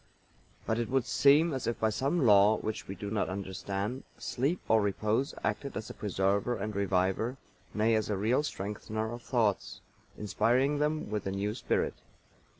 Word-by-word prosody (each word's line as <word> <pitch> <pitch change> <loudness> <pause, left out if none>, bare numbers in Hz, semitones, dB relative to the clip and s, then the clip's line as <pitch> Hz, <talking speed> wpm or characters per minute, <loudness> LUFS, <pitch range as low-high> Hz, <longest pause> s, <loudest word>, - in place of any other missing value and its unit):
But 110 +1 0
it 115 - -2
would 130 -2 +1
seem 150 +5 +4
as 130 - -3
if 115 - -1
by 110 0 +2
some 140 +7 0
law 105 0 +6
which 110 0 -4
we 95 - -5
do 100 +2 -6
not 105 -3 0
understand 100 +5 -4
Sleep 140 +8 -1
or 110 0 +4
repose 110 +7 0
acted 140 - -2
as 110 - -5
a - - -8
preserver 100 +3 0
and 105 +1 -4
reviver, 100 +5 0 0.4
nay, 110 +2 +3
as 110 -1 +1
a 105 - 0
real 115 +8 +2
strengthener 110 -3 -4
of 120 - -7
Thoughts, 110 -5 0 0.4
inspiring 125 +7 +1
them 150 -5 -1
with 105 -2 -2
a - - -1
new 100 +2 -2
spirit. 120 - 0
110 Hz, 170 wpm, -30 LUFS, 100-130 Hz, 0.4 s, law